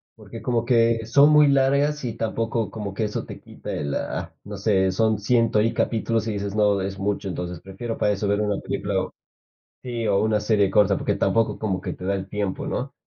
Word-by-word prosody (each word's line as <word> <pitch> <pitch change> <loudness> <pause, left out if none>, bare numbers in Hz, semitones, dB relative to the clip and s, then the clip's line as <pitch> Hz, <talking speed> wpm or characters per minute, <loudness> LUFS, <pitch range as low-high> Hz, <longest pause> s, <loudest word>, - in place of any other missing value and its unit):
porque - - -10
como 120 -2 0
que 115 -2 +3
son 140 +6 +5
muy 150 -1 +6
largas 140 +2 +2
y 115 -3 -2
tampoco 115 0 -2
como 100 -3 -6
que 110 - -1
eso 105 - -3
te - - -9
quita - - -9
el, 70 -1 -3
ah, - - -4
no 105 0 -7
sé, 95 -2 +2
son 110 +2 +1
ciento 115 0 +2
y 115 - +2
capítulos 115 -1 0
y 110 - -1
dices: 100 0 -4
"No, 105 -2 +3
es 95 0 -4
mucho", 100 0 -2
entonces 90 -2 -5
prefiero 115 +5 -6
para 105 - +2
eso 100 +1 -2
ver 100 +1 +1
una 105 -1 0
película - - -2
o - - -8 0.7
sí, 120 -3 -3
o 100 -1 +3
una 110 -1 +2
serie 105 -2 +2
corta, 100 -1 +4
porque - - -1
tampoco 115 -1 +1
como 95 -4 -2
que - - -4
te 90 - -8
da 100 +1 +1
el 95 0 -5
tiempo, 105 +7 -3
¿no? 135 -2 -3
105 Hz, 220 wpm, -24 LUFS, 100-115 Hz, 0.7 s, muy